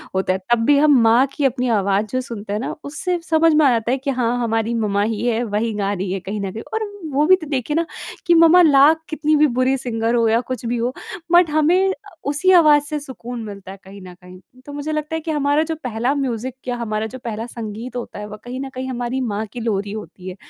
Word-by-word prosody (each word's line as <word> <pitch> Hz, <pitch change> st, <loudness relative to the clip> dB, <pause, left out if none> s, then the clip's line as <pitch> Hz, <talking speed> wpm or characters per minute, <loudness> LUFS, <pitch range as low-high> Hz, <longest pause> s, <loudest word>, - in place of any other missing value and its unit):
होता 190 Hz, 0 st, +1 dB
है, 185 Hz, -, -3 dB
तब 235 Hz, -1 st, +3 dB
भी 290 Hz, +2 st, +5 dB
हम 290 Hz, -2 st, +5 dB
माँ 230 Hz, +3 st, +5 dB
की 285 Hz, -, -1 dB
अपनी 250 Hz, -1 st, 0 dB
आवाज़ 200 Hz, +2 st, +1 dB
जो 255 Hz, -, 0 dB
सुनते 220 Hz, -5 st, -7 dB
हैं 210 Hz, -, -1 dB
ना, 245 Hz, -, -4 dB
उससे 345 Hz, +5 st, -3 dB
समझ 325 Hz, 0 st, +4 dB
में 305 Hz, 0 st, +4 dB
आता 235 Hz, -3 st, +2 dB
है 265 Hz, -, +1 dB
कि 275 Hz, +1 st, -4 dB
हाँ, 245 Hz, -2 st, 0 dB
हमारी 225 Hz, 0 st, 0 dB
मम्मा 205 Hz, -3 st, 0 dB
ही 220 Hz, +1 st, -2 dB
है, 235 Hz, -1 st, +1 dB
वही 220 Hz, 0 st, -1 dB
गा 200 Hz, -1 st, -1 dB
रही 190 Hz, -1 st, -3 dB
है 195 Hz, -, -2 dB
कहीं 200 Hz, +3 st, -5 dB
न 195 Hz, -1 st, -3 dB
कहीं। 220 Hz, +4 st, -7 dB
और 440 Hz, -1 st, -1 dB, 0.3 s
वो 290 Hz, +3 st, +3 dB
भी 370 Hz, +4 st, +7 dB
तो 320 Hz, -4 st, -9 dB
देखिए 275 Hz, +1 st, -2 dB
ना, 335 Hz, +1 st, +1 dB, 0.4 s
कि 345 Hz, -, +6 dB
मम्मा 335 Hz, +2 st, +7 dB
लाख 300 Hz, 0 st, +6 dB
कितनी 310 Hz, -1 st, +1 dB
भी 300 Hz, 0 st, +5 dB
बुरी 260 Hz, +1 st, +3 dB
सिंगर 230 Hz, -2 st, -1 dB
हो 230 Hz, -1 st, +3 dB
या 225 Hz, +1 st, +3 dB
कुछ 255 Hz, -1 st, -4 dB
भी 240 Hz, +1 st, -1 dB
हो, 240 Hz, +2 st, -1 dB, 0.4 s
बट 350 Hz, -1 st, +6 dB
हमें 330 Hz, +6 st, +3 dB
अ, -, -, +1 dB, 0.3 s
उसी 295 Hz, +7 st, +2 dB
आवाज़ 305 Hz, -4 st, +6 dB
से 300 Hz, +1 st, -4 dB
सुकून 245 Hz, -4 st, -8 dB
मिलता 200 Hz, -3 st, -9 dB
है 195 Hz, -, -10 dB
कहीं 195 Hz, +1 st, -12 dB
न 180 Hz, -1 st, -11 dB
कहीं। 180 Hz, 0 st, -13 dB, 0.3 s
तो 290 Hz, -, -9 dB
मुझे 290 Hz, +2 st, -4 dB
लगता 305 Hz, +1 st, -3 dB
है 320 Hz, -, -3 dB
कि 320 Hz, -, -3 dB
हमारा 290 Hz, 0 st, +2 dB
जो 320 Hz, 0 st, -3 dB
पहला 240 Hz, +2 st, -1 dB
म्यूज़िक 255 Hz, -2 st, -3 dB
क्या 250 Hz, -1 st, -3 dB
हमारा 215 Hz, -2 st, -2 dB
जो -, -, -8 dB
पहला 225 Hz, -1 st, -4 dB
संगीत 230 Hz, +1 st, -7 dB
होता 245 Hz, -3 st, -6 dB
है, 210 Hz, -, -6 dB
वो 210 Hz, 0 st, -9 dB
कहीं 250 Hz, +1 st, -6 dB
न 275 Hz, -, -5 dB
कहीं 260 Hz, +1 st, -4 dB
हमारी 245 Hz, +1 st, -3 dB
माँ 215 Hz, -3 st, -2 dB
की 245 Hz, -, -6 dB
लोरी 205 Hz, -3 st, -2 dB
होती 185 Hz, -3 st, -8 dB
है 180 Hz, -, -8 dB
245 Hz, 255 wpm, -20 LUFS, 220-295 Hz, 0.4 s, भी